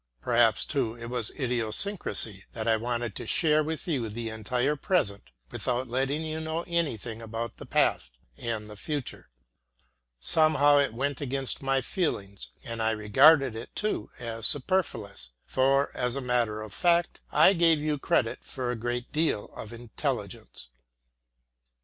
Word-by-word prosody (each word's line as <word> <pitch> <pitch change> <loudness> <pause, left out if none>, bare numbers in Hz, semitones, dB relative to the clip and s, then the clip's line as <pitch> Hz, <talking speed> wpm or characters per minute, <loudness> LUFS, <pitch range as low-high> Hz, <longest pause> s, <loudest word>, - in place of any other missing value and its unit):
Perhaps - - +3
too 110 0 -1
it 120 0 -7
was 120 -3 +1
idiosyncrasy 120 - 0
that 110 -1 -4
I 115 - +4
wanted 120 -1 -2
to - - -6
share 155 -1 +3
with 160 +3 -4
you 130 -9 -1
the 115 +2 -4
entire 125 +6 -1
present, 120 - -1 0.2
without 125 +1 -1
letting 135 +5 0
you 155 0 -3
know 160 +1 -3
anything 125 - -2
about 115 0 -5
the - - -10
past - - +1 0.2
and 110 - -4
the 105 - -10
future. 145 +5 -4 0.9
Somehow 145 - +4
it 140 -5 0
went 140 +2 -2
against 135 -1 -2
my 135 0 +1
feelings, 105 - -3
and 115 -1 -5
I 110 - +2
regarded 130 +5 +5
it 115 - -8
too 210 - -1
as 115 -2 0
superfluous; 130 - -1
for, 135 +2 +2
as 125 0 0
a - - -1
matter 120 -4 0
of 110 - -10
fact, 175 -1 +2
I 195 - +6
gave 165 -3 +4
you 150 -1 -1
credit 115 -3 0
for 125 -2 -4
a - - -2
great 120 +2 -3
deal 155 -9 -1
of 110 - -8
intelligence. 120 - -5
125 Hz, 150 wpm, -28 LUFS, 115-150 Hz, 0.9 s, I